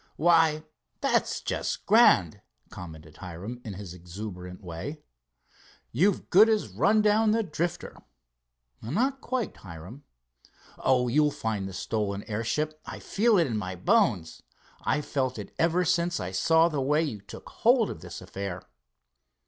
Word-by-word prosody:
"Why, 160 Hz, -1 st, +3 dB, 0.4 s
that's -, -, 0 dB
just -, -, -3 dB
grand," -, -, +5 dB, 0.3 s
commented 80 Hz, -3 st, -10 dB
Hiram 95 Hz, +7 st, -8 dB
in 110 Hz, -, -6 dB
his 95 Hz, -3 st, -8 dB
exuberant 90 Hz, +1 st, -8 dB
way. 95 Hz, -, -7 dB, 0.9 s
"You've 180 Hz, -, +1 dB
good 210 Hz, +5 st, +7 dB
as 215 Hz, -, +1 dB
run 185 Hz, -, +2 dB
down 215 Hz, +1 st, +3 dB
the 225 Hz, +1 st, +2 dB
Drifter." 175 Hz, -1 st, -4 dB, 0.8 s
"Not 250 Hz, -, -1 dB
quite, 255 Hz, -3 st, -3 dB
Hiram." 90 Hz, -, -11 dB, 0.8 s
"Oh, 125 Hz, -1 st, +2 dB
you'll 150 Hz, +5 st, +3 dB
find 110 Hz, -9 st, -3 dB
the 95 Hz, -, -8 dB
stolen 100 Hz, +1 st, -2 dB
airship. 150 Hz, +8 st, -2 dB
I -, -, -8 dB
feel 220 Hz, +1 st, +2 dB
it 170 Hz, -, +4 dB
in 115 Hz, -6 st, -2 dB
my 95 Hz, -3 st, -4 dB
bones. 115 Hz, -, +1 dB, 0.4 s
I've 150 Hz, -, 0 dB
felt 130 Hz, -3 st, -1 dB
it 105 Hz, -, -8 dB
ever 170 Hz, +2 st, +2 dB
since 170 Hz, 0 st, +1 dB
I 90 Hz, 0 st, -4 dB
saw 160 Hz, -, +4 dB
the 150 Hz, -5 st, -2 dB
way 150 Hz, +4 st, +2 dB
you 115 Hz, -10 st, -4 dB
took 100 Hz, -, -11 dB
hold 235 Hz, -2 st, +3 dB
of 80 Hz, -, -9 dB
this -, -, -9 dB
affair." 95 Hz, -2 st, -6 dB
130 Hz, 145 wpm, -27 LUFS, -, 0.9 s, good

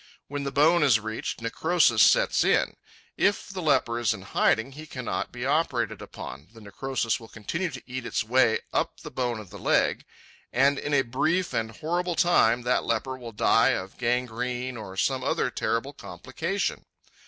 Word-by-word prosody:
When 145 Hz, 0 st, -4 dB
the 140 Hz, -, -2 dB
bone 155 Hz, +5 st, +4 dB
is 130 Hz, -7 st, +5 dB
reached, 110 Hz, +1 st, -5 dB
necrosis 130 Hz, -2 st, +3 dB
sets -, -, +5 dB
in. -, -, +2 dB, 0.4 s
If 200 Hz, 0 st, +1 dB
the 190 Hz, -1 st, -5 dB
leper 130 Hz, -6 st, +2 dB
is 120 Hz, -3 st, +1 dB
in 95 Hz, -, -11 dB
hiding, 110 Hz, +5 st, +1 dB
he 155 Hz, +3 st, -10 dB
cannot 120 Hz, -, -4 dB
be 120 Hz, +1 st, -5 dB
operated 135 Hz, -6 st, 0 dB
upon, 70 Hz, +3 st, -9 dB
the -, -, -12 dB
necrosis 115 Hz, +3 st, -2 dB
will 115 Hz, -, -12 dB
continue 170 Hz, -, -3 dB
to 130 Hz, -4 st, -9 dB
eat 130 Hz, -1 st, -5 dB
its 110 Hz, -, -1 dB
way 120 Hz, 0 st, +3 dB
up -, -, -1 dB
the -, -, -9 dB
bone 120 Hz, -3 st, -2 dB
of 105 Hz, -5 st, -11 dB
the -, -, -9 dB
leg, -, -, +2 dB, 0.5 s
and 135 Hz, +3 st, +3 dB
in 145 Hz, -, -1 dB
a 135 Hz, -, +4 dB
brief 165 Hz, +9 st, 0 dB
and 110 Hz, 0 st, -1 dB
horrible 175 Hz, +9 st, -2 dB
time 125 Hz, -9 st, +3 dB
that 125 Hz, +1 st, +1 dB
leper 125 Hz, +3 st, -1 dB
will 120 Hz, -3 st, -9 dB
die 115 Hz, +1 st, +3 dB
of 95 Hz, +1 st, -8 dB
gangrene 125 Hz, +1 st, -1 dB
or 95 Hz, -4 st, -8 dB
some 130 Hz, +4 st, 0 dB
other -, -, 0 dB
terrible 125 Hz, +5 st, -2 dB
complication. 140 Hz, -, -4 dB
125 Hz, 175 wpm, -26 LUFS, 115-145 Hz, 0.5 s, is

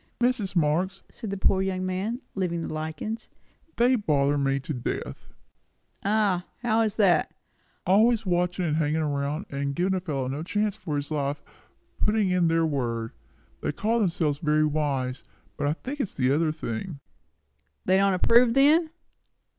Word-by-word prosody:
"Mrs. 240 Hz, -6 st, +1 dB
Marx," 175 Hz, +4 st, +1 dB
said 225 Hz, -3 st, -7 dB
the 200 Hz, -, -3 dB
poor 190 Hz, 0 st, +2 dB
young 185 Hz, -1 st, -1 dB
man, 195 Hz, +7 st, -2 dB
leaving 175 Hz, -3 st, -2 dB
the -, -, -5 dB
lichens, 160 Hz, +9 st, -5 dB, 0.5 s
"they 245 Hz, +2 st, +4 dB
bother 145 Hz, -, +1 dB
me 135 Hz, -1 st, +1 dB
to 140 Hz, +3 st, -5 dB
death!" 120 Hz, -3 st, -5 dB, 0.7 s
"Ah? 200 Hz, -3 st, +1 dB, 0.2 s
How 225 Hz, -1 st, +2 dB
is 220 Hz, -2 st, 0 dB
that?" 195 Hz, -5 st, +3 dB, 0.5 s
"Always 220 Hz, +4 st, +4 dB
watching, 180 Hz, 0 st, 0 dB
and 155 Hz, -2 st, 0 dB
hanging 155 Hz, 0 st, +1 dB
around, 145 Hz, +4 st, -2 dB
and 140 Hz, 0 st, -2 dB
giving 185 Hz, +4 st, +1 dB
a 190 Hz, -, +1 dB
fellow 145 Hz, -8 st, -3 dB
no 140 Hz, +3 st, -3 dB
chance 210 Hz, +4 st, -1 dB
for 170 Hz, -8 st, -4 dB
his 145 Hz, +1 st, -3 dB
life, 145 Hz, -1 st, -2 dB, 0.6 s
and -, -, -1 dB
putting 210 Hz, -3 st, +2 dB
in 180 Hz, -2 st, +3 dB
their 165 Hz, 0 st, +2 dB
word. 120 Hz, -6 st, -2 dB, 0.5 s
They -, -, -1 dB
call 230 Hz, +2 st, 0 dB
themselves 165 Hz, -7 st, 0 dB
very 155 Hz, 0 st, +2 dB
wise, 140 Hz, -4 st, -1 dB, 0.3 s
but 145 Hz, -, -1 dB
I 145 Hz, -, +2 dB
think 270 Hz, -, -7 dB
it 265 Hz, -, 0 dB
is -, -, -14 dB
the 130 Hz, -1 st, +2 dB
other 155 Hz, +2 st, +2 dB
thing." 155 Hz, +2 st, -5 dB, 0.9 s
"They 185 Hz, +1 st, +4 dB
don't 195 Hz, -1 st, +3 dB
approve, 230 Hz, +5 st, +4 dB
then?" 310 Hz, +4 st, +5 dB
175 Hz, 170 wpm, -26 LUFS, 145-205 Hz, 0.9 s, then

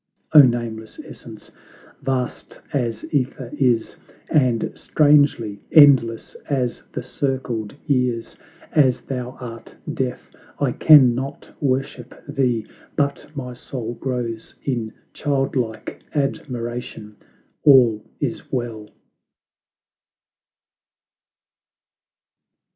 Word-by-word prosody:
O 150 Hz, -, +11 dB
Nameless 120 Hz, -4 st, -1 dB
Essence, -, -, -12 dB, 0.5 s
vast 130 Hz, -2 st, -3 dB
as 115 Hz, -5 st, -1 dB
^ther 130 Hz, -3 st, -2 dB
is, 125 Hz, -6 st, +1 dB, 0.3 s
And 125 Hz, -7 st, +2 dB
strangely, 145 Hz, -9 st, +2 dB
endless 130 Hz, -7 st, +5 dB, 0.2 s
as 130 Hz, -4 st, -1 dB
the 125 Hz, -, -5 dB
circled 130 Hz, -4 st, -3 dB
years, 125 Hz, -4 st, 0 dB, 0.4 s
As 135 Hz, -5 st, +3 dB
thou 125 Hz, -1 st, -5 dB
art 115 Hz, -2 st, -9 dB, 0.2 s
deaf, -, -, -4 dB, 0.3 s
I -, -, +1 dB
can 140 Hz, -6 st, +7 dB
not 135 Hz, +3 st, -6 dB
worship 130 Hz, -2 st, -2 dB
thee, 125 Hz, -6 st, 0 dB, 0.3 s
But 140 Hz, -1 st, -1 dB
my 125 Hz, -3 st, -5 dB
soul 120 Hz, -1 st, -6 dB
glows 120 Hz, -3 st, -4 dB
in 120 Hz, -5 st, -2 dB, 0.2 s
child 140 Hz, -2 st, -1 dB
like 110 Hz, -4 st, -3 dB
admiration: 120 Hz, -6 st, -4 dB, 0.5 s
All 120 Hz, -7 st, +6 dB, 0.2 s
is -, -, -4 dB
well. 115 Hz, -4 st, -4 dB
125 Hz, 90 wpm, -22 LUFS, 115-135 Hz, 0.5 s, O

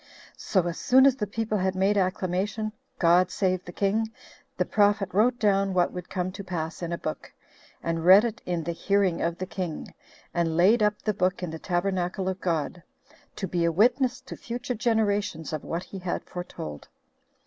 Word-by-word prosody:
So 185 Hz, -3 st, +1 dB
as 170 Hz, -1 st, -3 dB
soon 260 Hz, +1 st, +5 dB
as 270 Hz, -2 st, +4 dB
the 210 Hz, -, -2 dB
people 215 Hz, 0 st, -2 dB
had 190 Hz, 0 st, 0 dB
made 195 Hz, +2 st, +2 dB
acclamation, 195 Hz, +2 st, -1 dB, 0.3 s
God 175 Hz, +1 st, +4 dB
save 185 Hz, -2 st, 0 dB
the 175 Hz, -, -8 dB
king, 215 Hz, +4 st, 0 dB, 0.5 s
the -, -, +1 dB
prophet 205 Hz, -2 st, +2 dB
wrote 235 Hz, +5 st, +3 dB
down 195 Hz, -4 st, +2 dB
what 175 Hz, -1 st, +2 dB
would 180 Hz, -1 st, -7 dB
come 185 Hz, -1 st, -2 dB
to 200 Hz, +2 st, -8 dB
pass 170 Hz, -3 st, -4 dB
in 170 Hz, -1 st, -3 dB
a 170 Hz, -, -1 dB
book, 155 Hz, -, -5 dB, 0.5 s
and 165 Hz, -1 st, -1 dB
read 190 Hz, +5 st, +8 dB
it 225 Hz, -2 st, -4 dB
in 175 Hz, -2 st, -2 dB
the 170 Hz, -, -2 dB
hearing 195 Hz, 0 st, +1 dB
of 170 Hz, 0 st, -1 dB
the 185 Hz, -, -3 dB
king, 180 Hz, -2 st, -5 dB, 0.4 s
and 165 Hz, -2 st, 0 dB
laid 210 Hz, +7 st, +5 dB
up 210 Hz, 0 st, +2 dB
the 215 Hz, -, +1 dB
book 185 Hz, -1 st, 0 dB
in 175 Hz, -, -3 dB
the 160 Hz, -, -6 dB
tabernacle 180 Hz, +1 st, -1 dB
of 190 Hz, 0 st, -3 dB
God, 170 Hz, 0 st, -1 dB, 0.5 s
to 195 Hz, -, -3 dB
be 175 Hz, -1 st, 0 dB
a 170 Hz, -, +3 dB
witness 245 Hz, -, +2 dB
to -, -, -9 dB
future 245 Hz, +2 st, -4 dB
generations 210 Hz, -, 0 dB
of 155 Hz, -, -3 dB
what 170 Hz, +2 st, -3 dB
he 195 Hz, -, -8 dB
had 180 Hz, -1 st, -3 dB
foretold. 125 Hz, -, -7 dB
185 Hz, 190 wpm, -26 LUFS, 175-210 Hz, 0.5 s, read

